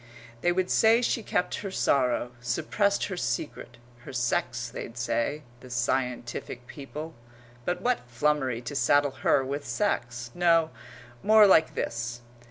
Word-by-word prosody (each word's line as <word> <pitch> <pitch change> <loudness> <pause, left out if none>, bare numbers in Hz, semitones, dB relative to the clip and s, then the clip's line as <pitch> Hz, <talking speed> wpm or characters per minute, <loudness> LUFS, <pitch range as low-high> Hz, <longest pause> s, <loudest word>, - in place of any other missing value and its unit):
They 175 - +3
would 185 +1 0
say 230 +2 +5
she 235 - +1
kept 180 - -1
her 200 - -5
sorrow, 125 -8 +1
suppressed 200 - 0
her 190 - -4
secret 120 -3 -3 0.2
her 120 - -10
sex, 120 0 -1
they'd 115 0 -8
say 120 +5 -1 0.2
the 130 - -13
scientific 125 0 -2
people. 150 +4 -8 0.5
But 175 - -2
what 245 - 0
flummery 130 -1 0
to 125 +4 -6
saddle 145 0 +3
her 135 - +3
with 140 +2 -3
sex! 120 - -2
No 165 -2 +3 0.5
more 215 0 +7
like 160 -5 +5
this. 120 +1 -3
135 Hz, 140 wpm, -27 LUFS, 120-175 Hz, 0.5 s, more